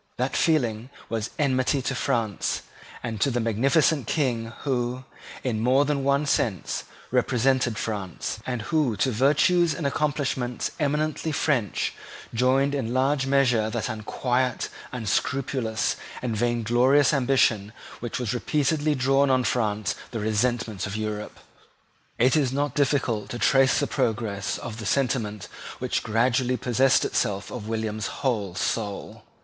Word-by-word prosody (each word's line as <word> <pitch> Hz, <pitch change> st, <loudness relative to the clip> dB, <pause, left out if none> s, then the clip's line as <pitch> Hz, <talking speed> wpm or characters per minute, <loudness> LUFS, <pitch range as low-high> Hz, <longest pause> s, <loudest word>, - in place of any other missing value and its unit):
That 130 Hz, +2 st, -1 dB
feeling 125 Hz, -7 st, +1 dB, 0.2 s
was 110 Hz, -1 st, -2 dB
enmity 135 Hz, -1 st, +2 dB
to 135 Hz, -, -1 dB
France, 120 Hz, -5 st, -1 dB, 0.4 s
and 115 Hz, -3 st, -4 dB
to 140 Hz, -, +3 dB
the 120 Hz, -2 st, 0 dB
magnificent 135 Hz, +6 st, +2 dB
King 125 Hz, -7 st, 0 dB, 0.2 s
who, 125 Hz, -2 st, -1 dB, 0.4 s
in 120 Hz, -5 st, -1 dB
more 130 Hz, +5 st, +3 dB
than 145 Hz, -1 st, 0 dB
one 140 Hz, +2 st, +2 dB
sense, 110 Hz, -, -1 dB, 0.3 s
represented 125 Hz, -2 st, +2 dB
France, 100 Hz, -5 st, -4 dB
and 125 Hz, -4 st, -2 dB
who 145 Hz, -7 st, +1 dB
to 130 Hz, -, +1 dB
virtues 150 Hz, +7 st, +3 dB
and 150 Hz, -, -4 dB
accomplishments 140 Hz, -4 st, -1 dB
eminently 155 Hz, +2 st, 0 dB
French 130 Hz, -, 0 dB, 0.4 s
joined 130 Hz, +4 st, +2 dB
in 125 Hz, -4 st, -2 dB
large 135 Hz, +1 st, +2 dB
measure 125 Hz, -5 st, +3 dB
that 115 Hz, +1 st, -2 dB
unquiet, 125 Hz, +3 st, -1 dB, 0.2 s
unscrupulous, 120 Hz, +1 st, -1 dB, 0.3 s
and 120 Hz, -3 st, -1 dB
vainglorious 120 Hz, +5 st, +3 dB
ambition 125 Hz, -6 st, +2 dB, 0.3 s
which 120 Hz, -1 st, -4 dB
has 125 Hz, -2 st, -2 dB
repeatedly 150 Hz, +4 st, +1 dB
drawn 135 Hz, +1 st, +3 dB
on 130 Hz, -1 st, +3 dB
France 110 Hz, -3 st, 0 dB, 0.2 s
the 115 Hz, -, -4 dB
resentment 110 Hz, -1 st, 0 dB
of 100 Hz, -, -5 dB
Europe. 105 Hz, -1 st, -4 dB, 0.8 s
It 125 Hz, +4 st, +4 dB
is 140 Hz, -5 st, +2 dB
not 140 Hz, 0 st, -1 dB
difficult 135 Hz, -7 st, 0 dB
to 120 Hz, -, -4 dB
trace 135 Hz, +2 st, +4 dB
the -, -, +1 dB
progress 105 Hz, -4 st, -1 dB
of 115 Hz, 0 st, -7 dB
the 110 Hz, -, -4 dB
sentiment 115 Hz, -6 st, 0 dB, 0.3 s
which -, -, -1 dB
gradually 125 Hz, +3 st, +1 dB
possessed 125 Hz, +2 st, +3 dB
itself 100 Hz, -1 st, -1 dB
of 115 Hz, -4 st, -6 dB
William's 110 Hz, -1 st, -2 dB
whole 105 Hz, -9 st, -2 dB
soul. 100 Hz, 0 st, -3 dB
125 Hz, 135 wpm, -25 LUFS, 110-140 Hz, 0.8 s, It